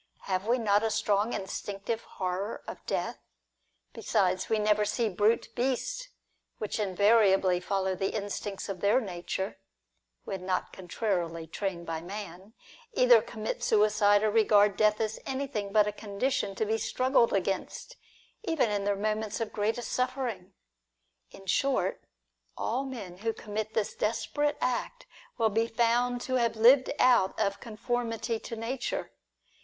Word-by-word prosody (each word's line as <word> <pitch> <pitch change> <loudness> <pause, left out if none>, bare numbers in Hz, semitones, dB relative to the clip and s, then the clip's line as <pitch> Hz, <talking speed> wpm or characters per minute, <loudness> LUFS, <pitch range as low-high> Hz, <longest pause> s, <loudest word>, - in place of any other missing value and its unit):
Have 190 +1 -2
we 240 +2 +3
not 210 -3 +3
a 225 - +1
strong 210 +1 +1
instinctive 200 +3 -4
horror 190 +3 -4
of - - -8
death? - - -2 0.7
Besides, 185 -1 0
we 220 - +2
never 210 0 +3
see 220 +2 0
brute 210 +4 +2
beasts, 270 - -1 0.5
which 215 +1 -3
invariably 195 -2 +4
follow 190 +1 -1
the 195 +1 -1
instincts 205 -1 -4
of 195 -3 -5
their 205 +5 +4
nature 190 -2 -4 0.6
(when 190 -2 -5
not 185 0 -2
contrarily 175 -3 -2
trained 170 +1 -4
by 165 -1 -3
man), 195 +2 -8 0.4
either 245 - +6
commit 220 -1 -5
suicide, 210 -1 +4
or 215 - +2
regard 210 -2 +4
death 215 0 +3
as 220 -1 -2
anything 260 -7 -3
but 210 0 +5
a 210 - -1
condition 210 +1 -2
to 220 - 0
be 220 +1 0
struggled 255 -1 +2
against, 195 -1 -2 0.5
even 320 - +1
in 200 -1 -1
their 205 0 +2
moments 215 +1 -2
of 225 -2 -3
greatest 220 +3 -1
suffering. 245 -8 -2 0.7
In 195 - -14
short, 270 +8 0 0.5
all 255 +5 -1
men 210 -10 -7
who 225 +3 -2
commit 215 0 -5
this 215 -2 0
desperate 290 +7 -1
act, 375 - -2 0.3
will 225 -2 +3
be 225 +2 +1
found 240 +1 +1
to 255 0 0
have 235 -2 +1
lived 255 +4 +6
out 245 -8 +4
of 200 0 0
conformity 230 0 -2
to 230 - -7
nature. 235 +3 -3
215 Hz, 145 wpm, -29 LUFS, 195-235 Hz, 0.7 s, either